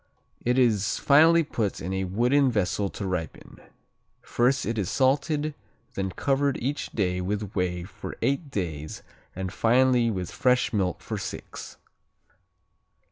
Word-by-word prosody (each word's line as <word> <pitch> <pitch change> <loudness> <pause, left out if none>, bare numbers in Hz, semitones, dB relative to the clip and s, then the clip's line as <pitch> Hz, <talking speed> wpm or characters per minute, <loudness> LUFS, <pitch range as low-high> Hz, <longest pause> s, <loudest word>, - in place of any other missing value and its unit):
It 125 +1 +1
is 105 -6 +2
finally 160 +4 +5
put 110 -9 -2
in 90 +3 -4
a 95 0 -1
wooden 125 +9 +2
vessel 100 -2 0
to 100 - -6
ripen. 90 -4 -5 0.6
First 125 +3 +1
it 115 -1 -2
is 95 - -1
salted, 145 +3 +1 0.4
then 95 0 -2
covered 140 +7 0
each 140 +5 -3
day 90 -4 0
with 100 +2 -3
whey 90 -2 -1
for 90 - -9
eight 140 +2 0
days 80 - -4 0.3
and 95 0 -4
finally 125 +1 +3
with 90 -5 -3
fresh 125 -2 +2
milk 95 -4 0
for - - -5
six. - - -7
115 Hz, 135 wpm, -26 LUFS, 95-135 Hz, 0.6 s, finally